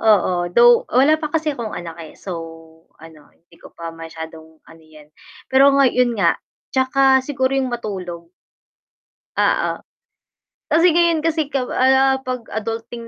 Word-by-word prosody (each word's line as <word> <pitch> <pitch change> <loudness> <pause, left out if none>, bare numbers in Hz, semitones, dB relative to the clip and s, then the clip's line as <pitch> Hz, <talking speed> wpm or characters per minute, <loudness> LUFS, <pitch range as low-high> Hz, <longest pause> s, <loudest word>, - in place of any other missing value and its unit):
Oo, 185 -5 +2
though 235 +5 +5
wala 295 +6 +3
pa 305 - -3
kasi 310 0 -1
akong 235 -6 -6
anak, 170 -2 -7
eh, 160 -2 -11
so 190 - -7 0.6
ano, 160 -2 -16
hindi 170 0 -25
ko - - -15
pa 165 -1 -7
masyadong 160 -1 -11
ano 165 0 -18
'yan. 155 -1 -18 0.4
Pero 270 +1 +6
nga 275 - +5
'yon 245 -2 +1
nga, 200 - +1 0.3
'tsaka 265 0 +3
siguro 260 -1 -2
'yong 270 -1 0
matulog. 180 -7 -6 1.1
Oo. - - +1 1.0
Kasi 335 +3 +4
ngayon 335 -1 +2
kasi 320 -2 0
kapa 270 -3 -3
ano, 265 +1 +3
'pag 250 -2 -3
adulting 230 +2 -5
240 Hz, 145 wpm, -19 LUFS, 170-270 Hz, 1.1 s, Pero